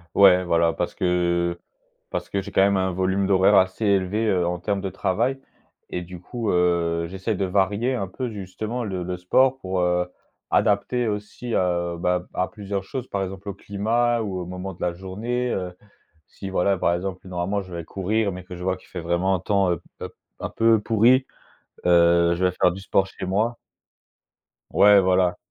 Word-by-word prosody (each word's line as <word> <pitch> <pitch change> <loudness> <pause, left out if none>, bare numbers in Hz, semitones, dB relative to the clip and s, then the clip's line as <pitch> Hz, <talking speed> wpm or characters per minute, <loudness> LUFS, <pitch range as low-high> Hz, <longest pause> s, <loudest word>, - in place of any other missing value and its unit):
Ouais, 90 -2 +6
voilà, 85 -1 +3
parce 85 +1 -3
que 85 -1 0 0.5
parce - - -4
que 100 - -1
j'ai - - -10
quand - - +4
même 100 0 +4
un 95 0 0
volume 95 +2 0
d'horaire 95 +1 +4
assez 95 +3 +3
élevé, 100 +3 +1
heu, 90 -3 +1
en 90 0 -2
termes 100 +3 -1
de 95 0 -3
travail, 120 +10 -1 0.5
et 90 - -4
du 90 0 -10
coup, 115 +2 -3
heu, 85 -1 +1
j'essaie 95 +4 -3
de 100 - -2
varier 100 +7 +1
un 100 -5 -2
peu 125 +7 -4
justement 110 +4 -5
le 95 -3 -3
le 90 0 -4
sport 130 +9 +3
pour, 95 -6 -2
heu, 90 0 +1 0.4
adapter 115 +4 +2
aussi, 105 +3 -5
heu, 85 -1 0
bah, 90 +1 0
à 90 - 0
plusieurs 100 -2 -5
choses, 130 +5 -6
par 100 -1 -1
exemple 95 +1 -6
au - - -4
climat 115 +5 0
ou 100 -4 -3
au 90 - -5
moment 90 +2 -6
de 85 - -18
la 90 - 0
journée, 110 +8 -3
heu, 90 -1 -3 0.5
si 95 - -8
voilà, 95 +1 +1
par 85 - +1
exemple, 95 +1 -5
normalement 95 +3 -2
je 90 -2 -9
vais 85 - -5
courir, 100 +4 -1
mais 90 0 -8
que 90 - -8
je 90 - -8
vois 95 0 0
qu'il - - -20
fait 90 - -6
vraiment 85 +3 +1
un - - -2
temps 100 -1 +2
un 85 - 0
p - - -22 0.2
un - - -4
p - - -22 0.2
un - - -4
peu 115 -1 +4
pourri, 115 +5 +4 0.6
heu, 85 -1 +5
je 90 - -2
vais 90 - +3
faire 90 - +5
du 95 +3 -8
sport 95 0 +2
chez 95 -1 -7
moi. 110 +5 0 1.1
Ouais, 105 0 +7
voilà. 90 -1 +2
95 Hz, 200 wpm, -24 LUFS, 90-105 Hz, 1.1 s, Ouais